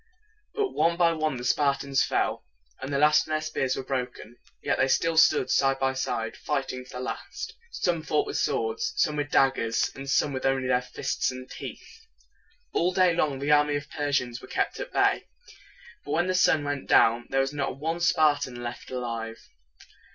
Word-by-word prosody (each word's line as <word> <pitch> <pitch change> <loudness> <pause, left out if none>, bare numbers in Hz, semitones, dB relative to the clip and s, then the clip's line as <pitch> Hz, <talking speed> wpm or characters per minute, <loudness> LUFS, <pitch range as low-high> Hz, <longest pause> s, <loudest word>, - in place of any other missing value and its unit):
But 415 -3 0
one 170 +1 +1
by 170 -1 +4
one 155 -4 -1
the 120 - -7
Spartans 140 +1 +1
fell. - - -1 0.4
At 135 - -5
last 150 +2 +4
their 155 0 0
spears 155 -4 -1
were 135 - -4
broken; 125 -3 -5 0.3
yet - - +1
still 165 +4 +2
they 160 - +5
stood 160 - +4
side 135 0 +3
by 135 0 0
side, 115 -4 -3
fighting 135 -3 -3
to - - -18
the 125 - -5
last. 240 - -6 0.2
Some 175 - -1
fought 150 -1 0
with - - -3
swords, 440 0 -1
some 150 - +1
with 145 -1 -2
daggers, 130 -5 +2
and 135 0 -8
some 140 +1 +2
with 130 - -4
only 135 -1 +1
their 125 0 +2
fists 125 - -2
and 130 0 -7
teeth. 450 - -10 0.7
All 175 +2 +2
day 185 -2 +4
long 150 -5 0
the 140 +2 -1
army 150 0 +4
of 145 - -2
the 145 - -22
Persians 135 -4 -1
was - - -12
kept - - -1
at - - -6
bay. - - +2 0.8
But - - -7
when 175 +2 +2
the 185 - 0
sun 160 -4 +3
went 145 -1 -3
down, 115 +1 +4
there 135 0 +2
was 135 +1 -2
not 140 -2 -2
one 165 +4 -2
Spartan 145 -7 +2
left 120 +1 -7
alive. 115 -3 -4
140 Hz, 190 wpm, -27 LUFS, 130-155 Hz, 0.8 s, they